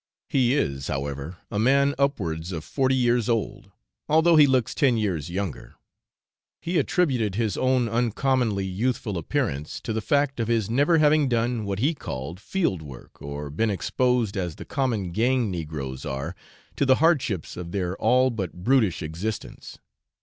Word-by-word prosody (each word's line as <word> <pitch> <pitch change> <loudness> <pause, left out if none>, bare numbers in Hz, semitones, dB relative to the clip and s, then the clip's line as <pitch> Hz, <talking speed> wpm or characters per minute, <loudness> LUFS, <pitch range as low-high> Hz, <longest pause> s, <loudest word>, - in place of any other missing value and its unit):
He 130 -1 +3
is, 70 - -1
however, 70 +4 -4
a 105 - -1
man 140 +4 +3
upwards 90 - -1
of 80 -3 -4
forty 130 - +1
years 120 -2 +2
old, 115 -2 -2 0.4
although 160 +2 +5
he 150 -2 +7
looks 130 -4 +1
ten 130 -5 +3
years 90 -9 -1
younger. 95 -2 -5 0.8
He 170 0 0
attributed 130 - +1
his 110 -3 0
own 130 -2 +2
uncommonly 115 -2 0
youthful 105 +2 -2
appearance 75 -3 -2
to 110 - -3
the 110 - -1
fact 140 +2 +1
of 115 - 0
his 115 -3 0
never 145 +7 +3
having 150 -2 +4
done 120 -1 0
what 100 -1 -2
he 140 +10 +1
called 80 - -6
field 135 - -1
work, 70 -5 -12
or 70 0 -6
been 110 +9 0
exposed, 120 +2 0
as 90 -5 -3
the - - -9
common 115 -10 -1
gang 120 +2 +1
negroes 75 -6 -5
are, 70 +6 -4 0.4
to 140 - +2
the 130 - +6
hardships 140 - +1
of 85 -1 -7
their 95 -1 -2
all 125 +3 +3
but 100 -7 -3
brutish 110 -9 +2
existence. 85 +8 -5
110 Hz, 160 wpm, -25 LUFS, 85-130 Hz, 0.8 s, he